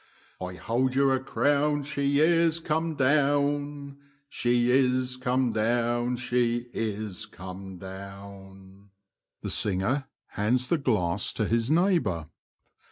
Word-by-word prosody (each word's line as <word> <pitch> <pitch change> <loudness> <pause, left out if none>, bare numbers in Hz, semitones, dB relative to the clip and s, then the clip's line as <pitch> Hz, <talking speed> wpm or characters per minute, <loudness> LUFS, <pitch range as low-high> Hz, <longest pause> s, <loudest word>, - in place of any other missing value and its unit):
I 90 0 -5
hold 125 +7 -1
you 135 0 +4
a 130 - +2
crown 145 +2 +1
she 140 -1 0
is 165 0 +3
come 160 0 -1
down. 145 0 +1 0.3
She 120 -1 +1
is 130 -1 +2
come 130 -1 0
down, 120 +2 +1
she 120 -1 0
is 105 -1 -3
come 95 -1 -9
down; 95 +1 -11 0.6
[Hands 120 +3 0
it 160 -5 0
to 105 -1 0
his 115 +1 0
neighbour. 155 - +1
125 Hz, 100 wpm, -27 LUFS, 100-140 Hz, 0.6 s, you